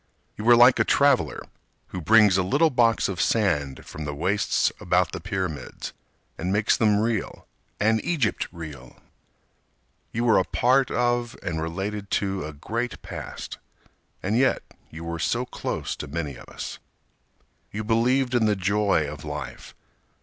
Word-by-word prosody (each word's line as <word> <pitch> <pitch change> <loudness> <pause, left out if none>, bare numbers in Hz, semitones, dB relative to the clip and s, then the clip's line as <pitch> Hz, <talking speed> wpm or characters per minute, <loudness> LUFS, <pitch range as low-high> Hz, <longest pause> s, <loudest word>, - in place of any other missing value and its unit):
You 105 - -6
were 120 0 +8
like 120 +2 +7
a - - +5
traveler 135 - +2 0.5
who 90 - -5
brings 105 +1 +6
a 95 - +3
little 145 - +3
box 115 -3 +3
of 95 -2 -2
sand 75 -11 0
From 80 - -7
the 75 -1 -4
wastes 95 +7 +1
about - - +1
the - - -5
pyramids 90 -6 -4 0.5
And 90 +3 -1
makes 105 +2 +3
them 105 -2 +3
real 110 -1 -2 0.3
and 110 +1 +2
Egypt 145 -10 0
real. 75 -7 -9 1.2
You 115 - -1
were 115 -4 +5
a - - +2
part 130 +6 +2
of 120 -1 0
and 80 -3 -2
related 100 +5 -4
to 95 -2 -2
a - - -6
great 115 +11 -4
past, - - -7 0.6
And 100 +4 0
yet 130 +2 +2 0.3
you 80 +1 -9
were 85 0 -4
so 120 +9 0
close - - -4
to 75 - -6
many 75 -2 -4
of - - -13
us. - - -7 0.9
You 110 +1 -4
believed 120 +4 +2
in 115 -3 +3
the 105 - +2
joy 100 -4 +1
of 75 0 -8
life. 75 0 -7
105 Hz, 155 wpm, -25 LUFS, 85-120 Hz, 1.2 s, were